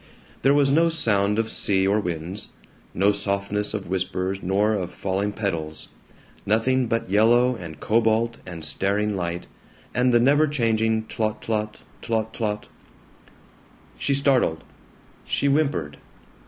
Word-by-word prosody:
There 140 +1 +4
was 140 -1 +3
no 165 +3 +4
sound 105 -10 +2
of 115 0 -1
sea 95 -2 +3
or 100 +2 +2
winds; 90 +1 -3 0.4
no 100 +2 +3
softness 100 +1 -2
of 100 -2 -4
whispers 95 +1 -2
nor 100 +4 +1
of 95 -4 -2
falling 100 +2 -2
petals; 80 -7 -4 0.5
nothing 125 +4 +1
but 115 0 -1
yellow 120 +4 +4
and 85 -8 -9
cobalt 115 +1 +1
and 85 -3 -7
staring 105 +2 0
light, 85 -1 -3 0.5
and 125 0 +2
the 120 - +5
never 145 +5 +4
changing 110 -5 +1
tlot 110 -1 -3
tlot, 105 -1 -2 0.3
tlot 110 -1 -2
tlot 105 -2 -2 1.4
She 140 - +1
startled. 135 - +2 0.6
She - - -1
whimpered. 140 - 0
105 Hz, 130 wpm, -24 LUFS, 95-115 Hz, 1.4 s, the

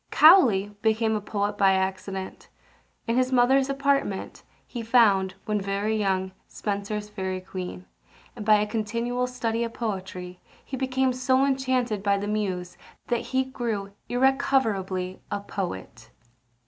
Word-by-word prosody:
Cowley 225 - +6
became 220 0 +2
a 215 - -1
poet 205 0 -2
by 195 -1 +5
accident. 190 0 -3 0.6
In 230 +1 0
his 255 0 +2
mother's 260 +2 +4
apartment 275 -7 -1 0.2
he 240 - -6
found, 205 -5 +3
when 210 -2 0
very 200 +3 -1
young, 190 -3 0 0.2
Spenser's 205 0 -3
Fairy 190 -3 -4
Queen; 185 - -7 0.5
and, - - -6
by 215 0 +6
a 210 0 +2
continual 230 +3 -2
study 235 -2 -2
of 230 -1 -5
poetry, 185 -5 -5 0.3
he 270 - -5
became 260 0 0
so 260 +1 +2
enchanted 260 -5 0
by 200 0 +2
the 205 +1 -3
Muse, 185 -4 -2 0.3
that 240 -1 0
he 260 0 +2
grew 230 -6 -4 0.2
irrecoverably 225 -8 +1
a 205 - -2
poet. 190 - -6
215 Hz, 135 wpm, -26 LUFS, 195-250 Hz, 0.6 s, Cowley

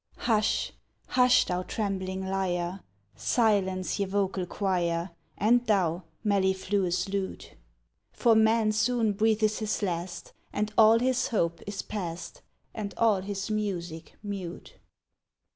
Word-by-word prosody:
Hush! 215 -2 +1 0.4
hush! 250 -1 +5
thou 180 0 -1
trembling 190 -2 -3
lyre, 185 -1 -1 0.4
Silence, 195 - +1
ye 200 - 0
vocal 190 -2 -1
choir, 175 -3 -1 0.3
And 235 +4 +4
thou, 180 -4 +1 0.2
mellifluous 190 -2 +1
lute, 195 -1 -4 0.6
For 235 - +3
man 220 0 +4
soon 225 0 +1
breathes 215 0 +2
his 215 -1 -2
last, 175 -1 -4 0.2
And 210 0 -2
all 220 0 +7
his 255 +1 +1
hope 170 -7 0
is 200 -1 -4
past, 185 - -6 0.3
And 205 -2 -5
all 215 -4 +3
his 195 +1 -4
music 175 -6 -3
mute. 195 -4 -7
200 Hz, 115 wpm, -28 LUFS, 185-215 Hz, 0.6 s, all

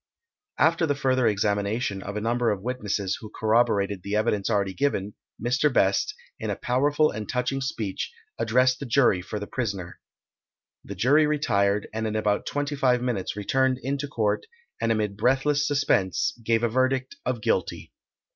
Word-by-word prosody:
After 165 +1 +3
the 145 - +1
further 130 -3 +2
examination 100 0 0
of 100 +2 -5
a - - -2
number 120 +1 +1
of 100 -3 -2
witnesses, 105 -6 -2
who 110 - -8
corroborated 110 -3 +1
the 100 +3 -3
evidence 105 -2 +1
already 100 -3 +1
given, 105 -6 -1 0.3
Mr. 125 +6 +1
Best, 125 - +2 0.2
in - - -3
a - - -1
powerful 145 +5 +2
and 105 0 -6
touching 130 +2 -1
speech, 110 -7 -3 0.3
addressed 125 +3 +3
the 140 - -5
jury 120 -7 +3
for 105 +3 -5
the 105 - -5
prisaner. 100 -8 -4 0.8
The 100 - -7
jury 140 +10 +4
retired, 105 -9 +1
and 110 0 -2
in 110 - -3
about 105 -1 0
25 140 -3 +1
minutes 100 -7 -2
returned 130 +5 +1
into 140 +2 -2
court, 110 - -1 0.3
and 115 - +1
amid 105 -2 -1
breathless 135 +6 +2
suspense 140 -10 +1
gave 115 +1 +1
a - - +4
verdict 130 - 0
of - - -1
Guilty. 480 - -1
115 Hz, 160 wpm, -25 LUFS, 105-135 Hz, 0.8 s, jury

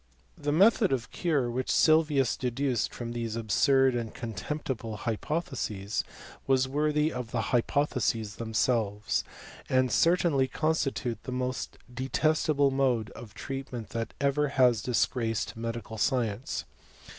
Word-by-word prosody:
The 145 0 -2
method 200 +5 +4
of 130 -1 -2
cure 150 -8 0
which 130 +2 -3
Sylvius 155 -5 +4
deduced 125 -1 -1
from 120 -1 -6
these 115 -2 -3
absurd 130 +5 +3
and 115 -2 -3
contemptible 115 0 -4
hypotheses, 110 - -2 0.4
was 130 -1 +3
worthy 150 +2 +1
of 125 -2 -5
the 115 - -2
h3rpotheses 115 -2 0
themselves; 110 -2 0 0.5
and 130 -1 +2
certainly 165 -1 +3
constitute 135 -6 -1
the 130 - -7
most 125 0 -3 0.2
detestable 140 +2 +1
mode 130 -5 +1
of 110 -2 -11
treatment 130 -5 -6
that 115 0 -4
ever 140 +1 +1
ha» 130 -3 +5
disgraced 115 0 -1
medical 115 -1 -5
science. 120 -2 -1
125 Hz, 120 wpm, -29 LUFS, 115-140 Hz, 0.5 s, ha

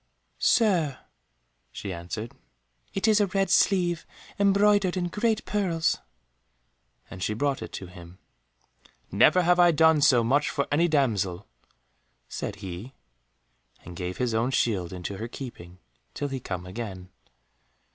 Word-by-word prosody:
"Sir," 175 - +2 0.7
she 100 -2 -6
answered, 90 +7 -6 0.6
"it 195 - 0
is 215 -1 +5
a 205 - +2
red 195 +1 0
sleeve, 175 -4 +2 0.3
embroidered 200 -1 +3
in 175 -1 -1
great 220 +4 0
pearls," 175 -6 0 1.1
and 95 - -9
she 105 - -1
brought 140 +3 -1
it - - -7
to 95 - -6
him. 90 -1 -13 0.9
"Never 180 - +5
have 175 +1 +3
I 175 0 +7
done 160 -1 +4
so 125 -4 +5
much 140 +6 +2
for 140 - -2
any 165 +4 +3
damsel," 105 - 0 0.8
said 100 - -5
he, 95 +9 -8 0.9
and 90 - -9
gave 90 +1 -5
his 125 -2 -1
own 115 +3 +1
shield 105 -10 0
into 95 +2 -6
her 115 - -5
keeping, 105 -9 -9 0.4
till 145 - -3
he 135 -1 -4
came 90 -6 -5
again. 95 -2 -7
135 Hz, 135 wpm, -26 LUFS, -, 1.1 s, I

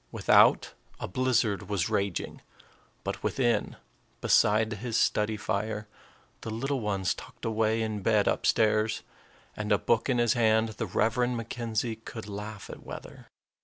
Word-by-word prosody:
Without, - - +4 0.3
a - - -4
blizzard 110 -3 0
was 100 -4 0
raging; 100 -3 -2 0.6
but - - -4
within, 120 -5 0 0.4
beside 110 +1 +3
his 115 +2 -3
study 105 -2 +1
fire, 110 0 -2 0.5
the - - -6
little 135 +5 -2
ones 100 -6 0
tucked - - -11
away 110 0 +1
in 110 -2 -3
bed 105 +1 +2
up - - +1
stairs, 110 0 +2 0.5
and 105 0 -4
a 105 - +5
book 115 +5 +1
in 125 - +2
his 120 0 +3
hand, 110 -2 +3
the 110 0 -4
Reverend 120 +6 +1
McKenzie 115 -1 -3
could 110 -2 -8
laugh 105 0 -7
at - - -9
weather. - - -10
110 Hz, 145 wpm, -28 LUFS, 105-115 Hz, 0.6 s, a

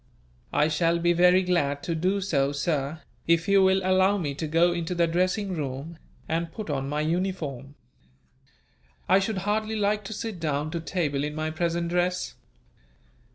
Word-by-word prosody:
"I 150 - +3
shall 165 +2 +1
be 175 +1 +2
very 180 +2 +5
glad 145 -6 0
to 170 - -2
do 185 +5 0
so, 140 -8 +1
sir, 145 0 -2 0.2
if 165 0 +3
you 200 -1 +5
will 190 0 +4
allow 185 +2 +3
me 150 -7 -2
to 155 +3 -4
go 165 +3 +3
into 175 +1 -3
the 170 0 +3
dressing 185 +4 0
room, 150 +1 -5 0.3
and 165 +1 -2
put 205 -3 -5
on 135 -1 -2
my 150 +1 -1
uniform. 155 -5 -3 1.3
I 190 - +5
should 195 +1 -2
hardly 215 +1 0
like 210 0 0
to 220 - -5
sit 220 -3 -5
down 150 -1 -1
to 170 - -2
table 155 -5 -1
in 150 0 -3
my 155 0 -2
present 170 +1 -1
dress." 180 +1 0
170 Hz, 170 wpm, -26 LUFS, 150-185 Hz, 1.3 s, very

